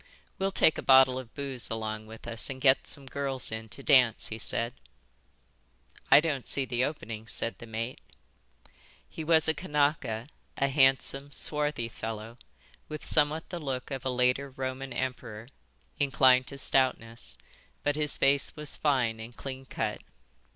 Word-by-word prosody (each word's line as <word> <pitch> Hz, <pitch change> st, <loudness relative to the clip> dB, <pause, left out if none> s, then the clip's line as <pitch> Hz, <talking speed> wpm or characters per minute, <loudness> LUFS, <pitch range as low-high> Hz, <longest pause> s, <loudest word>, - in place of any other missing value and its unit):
"We'll 195 Hz, 0 st, +1 dB
take 160 Hz, -, +3 dB
a -, -, -3 dB
bottle 130 Hz, -1 st, +6 dB
of 120 Hz, -3 st, -11 dB
booze 135 Hz, -4 st, -4 dB
along 110 Hz, -1 st, -4 dB
with 110 Hz, 0 st, -12 dB
us 115 Hz, -1 st, -3 dB
and 135 Hz, -1 st, -6 dB
get 130 Hz, 0 st, +3 dB
some 140 Hz, -, 0 dB
girls 135 Hz, -1 st, -2 dB
in 110 Hz, 0 st, -6 dB
to 100 Hz, -, -10 dB
dance," 130 Hz, -6 st, +4 dB
he 110 Hz, -, -6 dB
said. 115 Hz, +2 st, -2 dB, 1.4 s
"I -, -, +9 dB
don't 150 Hz, -5 st, -2 dB
see 140 Hz, -, -1 dB
the 125 Hz, 0 st, -1 dB
opening," 115 Hz, -6 st, -5 dB
said 115 Hz, +1 st, -3 dB
the 115 Hz, -, -10 dB
mate. 115 Hz, +3 st, -5 dB, 1.1 s
He 160 Hz, -, -7 dB
was 160 Hz, 0 st, +4 dB
a 160 Hz, -, +3 dB
Kanaka, 145 Hz, -8 st, -1 dB, 0.3 s
a 140 Hz, -, +1 dB
handsome, 135 Hz, 0 st, +3 dB
swarthy 150 Hz, -3 st, +1 dB
fellow, 110 Hz, +1 st, -7 dB, 0.5 s
with 155 Hz, -1 st, -7 dB
somewhat 155 Hz, +1 st, +1 dB
the 175 Hz, -, -5 dB
look 135 Hz, -4 st, -4 dB
of 135 Hz, -2 st, -4 dB
a 130 Hz, -, -1 dB
later 125 Hz, +2 st, +1 dB
Roman 130 Hz, 0 st, -5 dB
emperor, 120 Hz, -3 st, -5 dB, 0.5 s
inclined 130 Hz, -2 st, +4 dB
to 140 Hz, -, -8 dB
stoutness; 115 Hz, -, +1 dB, 0.5 s
but 145 Hz, 0 st, +1 dB
his 150 Hz, -1 st, +3 dB
face 140 Hz, +1 st, +3 dB
was 150 Hz, -2 st, 0 dB
fine 125 Hz, -7 st, +1 dB
and 115 Hz, +2 st, -10 dB
clean 135 Hz, -1 st, -7 dB
cut. -, -, -3 dB
130 Hz, 160 wpm, -29 LUFS, 115-140 Hz, 1.4 s, I